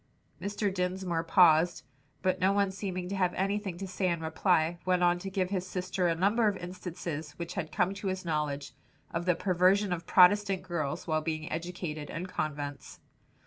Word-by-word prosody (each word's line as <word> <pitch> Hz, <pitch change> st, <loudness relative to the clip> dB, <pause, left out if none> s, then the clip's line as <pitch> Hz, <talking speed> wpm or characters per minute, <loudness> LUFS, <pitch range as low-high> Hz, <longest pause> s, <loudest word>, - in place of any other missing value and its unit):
'" -, -, -34 dB
Mr. 205 Hz, 0 st, -1 dB
Dinsmore 180 Hz, -2 st, -1 dB
paused, 165 Hz, -1 st, +4 dB, 0.4 s
but 185 Hz, -, +1 dB
no 190 Hz, +1 st, +3 dB
one 200 Hz, -1 st, +2 dB
seeming 185 Hz, -2 st, -4 dB
to 195 Hz, -, -3 dB
have 180 Hz, -2 st, +1 dB
anything 195 Hz, -1 st, -1 dB
to 195 Hz, +1 st, -5 dB
say 185 Hz, -1 st, -1 dB
in 170 Hz, -1 st, 0 dB
reply, 160 Hz, +1 st, +1 dB
went 180 Hz, -1 st, +2 dB
on 175 Hz, 0 st, +3 dB
to 195 Hz, -, -5 dB
give 190 Hz, -1 st, -1 dB
his 185 Hz, -2 st, -2 dB
sister 185 Hz, 0 st, -1 dB
a 165 Hz, -, +1 dB
number 210 Hz, +6 st, +3 dB
of 200 Hz, -2 st, +1 dB
instances 175 Hz, -4 st, -6 dB
which 170 Hz, +2 st, -6 dB
had 165 Hz, -5 st, -4 dB
come 180 Hz, +4 st, +1 dB
to 200 Hz, 0 st, -5 dB
his 185 Hz, -1 st, -3 dB
knowledge, 150 Hz, -3 st, -2 dB, 0.4 s
of 170 Hz, +1 st, -2 dB
the 180 Hz, -2 st, +3 dB
perversion 185 Hz, +2 st, +3 dB
of 170 Hz, -1 st, -5 dB
Protestant 195 Hz, 0 st, +5 dB
girls 170 Hz, -6 st, -3 dB
while 155 Hz, -1 st, 0 dB
being 155 Hz, 0 st, -3 dB
educated 160 Hz, -2 st, -4 dB
in 165 Hz, +3 st, -4 dB
convents. 145 Hz, -5 st, -4 dB
180 Hz, 185 wpm, -30 LUFS, 165-190 Hz, 0.4 s, Protestant